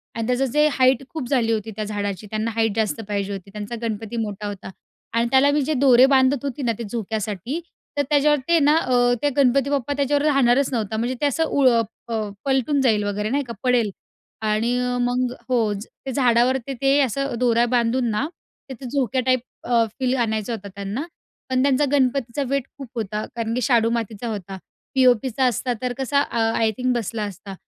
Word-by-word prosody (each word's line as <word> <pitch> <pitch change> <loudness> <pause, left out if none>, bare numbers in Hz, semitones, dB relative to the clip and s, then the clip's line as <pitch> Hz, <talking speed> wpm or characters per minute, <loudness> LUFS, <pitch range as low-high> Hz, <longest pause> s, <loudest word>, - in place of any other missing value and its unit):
आणि 225 -1 -2
त्याचं 250 +2 +1
जे 300 0 +4
हाईट 260 -1 +3
खूप 310 -6 -5
झाली 240 -5 +2
होती 220 0 -2
त्या 215 - -3
झाडाची, 205 -1 -4
त्यांना 220 +2 -2
हाईट 225 -2 +1
जास्त 220 0 -1
पाहिजे 200 -1 -2
होती, 195 0 -8
त्यांचा 210 +3 -6
गणपती 225 0 -4
मोठा 210 -2 -3
होता. 200 -2 -7 0.4
आणि 230 +1 +2
त्याला 270 +2 +5
मी 290 0 +2
जे 310 +3 0
दोरे 260 -2 +6
बांधत 270 0 +3
होते 280 0 -4
ना 235 - +2
ते 235 - -5
झोक्यासाठी 220 - -3 0.4
तर - - +4
त्याच्यावर 295 0 +4
ते 340 -1 +4
ना 295 +1 +4
अ, 245 -5 +3
ते 290 - +3
गणपती 275 0 +3
बाप्पा 285 -1 -1
त्याच्यावर 285 +1 +1
राहणारच 275 -2 +3
नव्हता, 220 -2 -2
म्हणजे 240 +3 -1
ते - - +2
असं 290 +3 +1
उ 285 -3 +1 0.4
अ, 220 -3 -2 0.2
पलटून 275 +1 +1
जाईल 220 -5 +2
वगैरे 205 +1 -2
नाही 280 +4 0
का 235 - -5
पडेल. 245 -4 +2 0.5
आणि 220 +3 +1 0.2
मग 245 0 0 0.2
हो, 225 -4 +2
ते 220 +6 -8
झाडावर 250 0 +3
ते 275 +2 +2
असं 275 +1 -1
दोऱ्या 240 -1 +3
बांधून 240 0 +2
ना 210 +8 0 0.4
तिथे 265 0 -8
झोक्या 260 -1 0
टाईप 255 0 +3 0.2
अ, 235 -2 +3 0.2
फील 255 0 +1
आणायचा 220 -1 -1
होता 205 -3 -6
त्यांना, 200 +7 -4 0.5
पण 255 0 +2
त्यांच्या 280 +1 +3
गणपतीचा 270 -1 +1
वेट 275 -1 0
खूप 275 -3 -8
होता 215 -2 -3
कारण 230 -1 -2
की 250 - -1
शाडू 230 -1 +3
मातीचा 230 -1 -3
होता. 195 -3 -5 0.4
पी.ओ.पीचा 255 0 +3
असता 250 +1 0
तर 250 -1 -1
कसा 275 +1 +1
अ, 235 - -2 0.2
आय 225 -1 +2
थिंक 255 0 +1
बसला 225 -1 -2
असता. 200 -1 -7
245 Hz, 190 wpm, -22 LUFS, 220-270 Hz, 0.5 s, दोरे